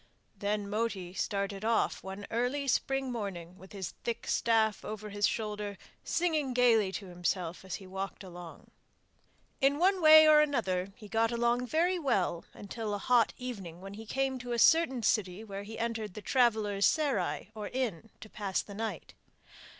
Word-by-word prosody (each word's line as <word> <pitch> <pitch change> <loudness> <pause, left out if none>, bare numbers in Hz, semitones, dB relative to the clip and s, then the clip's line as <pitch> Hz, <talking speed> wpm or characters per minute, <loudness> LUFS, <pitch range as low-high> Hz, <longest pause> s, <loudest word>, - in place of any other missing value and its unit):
Then 205 0 -2
Moti 205 -4 -2
started 200 0 -2
off 220 -8 +1
one 195 +1 -7
early 250 +5 -1
spring 270 0 0
morning 185 -7 -5
with 190 - -14
his 190 -4 -5
thick 235 -1 -3
staff 220 -2 +2
over 215 0 -6
his 205 0 +2
shoulder, 210 -2 -3 0.3
singing 310 -7 0
gaily 225 -6 +4
to 200 - -5
himself 175 -1 -3
as 190 -4 -5
he 190 - -9
walked 195 +1 -6
along. 175 -2 -11 0.9
In 275 +1 +4
one 375 +3 +3
way 315 0 +9
and 305 -1 +7
another 195 -11 0
he 215 -4 -12
got 225 +2 +1
along 240 +1 +1
very 350 +6 +1
well 190 - 0
until 210 0 -4
a - - -2
hot 235 +2 +3
evening 195 -10 -7
when 195 +1 -9
he 220 +2 -9
came 270 +1 -1
to 245 0 -4
a - - -1
certain 265 -2 +4
city 200 -2 0
where 200 -2 -6
he 215 +2 -8
entered 225 -4 -3
the 215 - -6
travellers' 215 -5 +3
'serai' 235 - 0
or 210 -2 -5
inn 225 -5 -3
to - - -9
pass 200 -3 -2
the 200 - -11
night. 210 -5 -5
215 Hz, 170 wpm, -31 LUFS, 195-245 Hz, 0.9 s, way